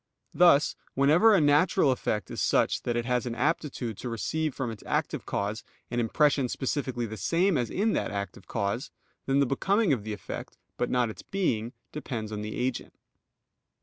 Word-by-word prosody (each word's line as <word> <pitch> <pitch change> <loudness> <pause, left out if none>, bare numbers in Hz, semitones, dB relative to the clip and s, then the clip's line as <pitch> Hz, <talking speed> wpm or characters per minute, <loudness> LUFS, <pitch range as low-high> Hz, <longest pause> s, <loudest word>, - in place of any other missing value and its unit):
Thus 170 -5 +5 0.2
whenever 160 +11 +5
a - - +5
natural 150 +1 +4
effect 105 -6 -2
is - - -3
such - - +2
that 120 - -2
it 120 0 -1
has 125 0 0
an 115 - -3
aptitude 130 -5 -1
to 125 - -4
receive 150 +6 -2
from 125 -4 -2
its 110 - -9
active - - -1
cause 105 +3 -2 0.3
an 120 - 0
impression 135 +2 +2
specifically 130 -3 -2
the 110 0 -6
same 180 - +2
as 120 -4 0
in 215 +3 +1
that - - -1
active 100 -1 -5
cause, 100 +6 -2 0.4
then 135 +1 +3
the 140 - +4
becoming 190 - +2
of 115 -6 -2
the 110 - -5
effect, 105 - -7 0.2
but 120 - -1
not 120 -3 +1
its - - -11
being, 120 - -1 0.2
depends 120 -8 -5
on 105 -1 -4
the 105 0 -5
agent. 125 0 -3
125 Hz, 180 wpm, -28 LUFS, 115-150 Hz, 0.4 s, Thus